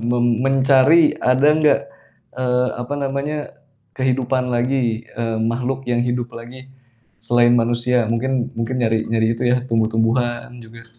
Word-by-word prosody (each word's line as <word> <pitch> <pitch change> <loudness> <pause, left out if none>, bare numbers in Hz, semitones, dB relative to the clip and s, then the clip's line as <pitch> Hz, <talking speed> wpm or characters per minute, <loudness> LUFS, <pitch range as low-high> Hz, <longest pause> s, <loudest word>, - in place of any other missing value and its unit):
mem 120 +1 0
mencari 135 +4 +4
ada 130 +3 +2
nggak, 155 -1 +3 0.6
eee, 125 0 0
apa 125 +4 -4
namanya, 140 +2 -2 0.6
kehidupan 130 -1 -1
lagi, 120 -2 -1
eee, 115 -1 -4
makhluk 125 +3 -2
yang 120 -1 +1
hidup 120 0 -2
lagi, 125 +3 -11 0.5
selain 120 +2 +2
manusia 120 +1 +1
mungkin 130 +1 -1
mungkin 115 +3 -2
nyari 110 -1 +2
nyari 110 0 +1
itu 115 - -6
ya 125 +1 +3
tumbuh-tumbuhan 115 +2 0
juga 115 0 -13
s 115 0 -22
120 Hz, 135 wpm, -19 LUFS, 115-130 Hz, 0.6 s, mencari